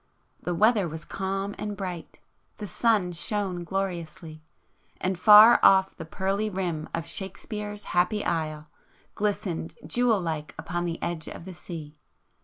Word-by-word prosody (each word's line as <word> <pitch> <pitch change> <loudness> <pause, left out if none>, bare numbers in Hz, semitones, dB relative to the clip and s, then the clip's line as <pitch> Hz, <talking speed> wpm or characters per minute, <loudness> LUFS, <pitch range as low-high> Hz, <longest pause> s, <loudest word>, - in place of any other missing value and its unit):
The 175 - -2
weather 210 0 +3
was 160 0 -8
calm 195 +1 -3
and 210 -1 -4
bright,... 180 -4 -6 0.4
the 210 - -6
sun 205 -1 +1
shone 185 0 -2
gloriously,—and 170 0 -6
far 215 +3 +9
off 190 0 +5
the 165 - -8
pearly 195 +5 -1
rim 175 -5 -3
of 165 -1 -3
Shakespeare's 205 +4 -5
'happy 180 +4 +1
isle' 155 -2 -2 0.5
glistened 200 -5 -2
jewel 240 -4 +2
like 160 -4 -4
upon 175 0 -3
the 170 -1 -3
edge 170 -2 -3
of 170 - -8
the 190 - -8
sea. 155 -4 -9
185 Hz, 135 wpm, -26 LUFS, 165-205 Hz, 0.5 s, far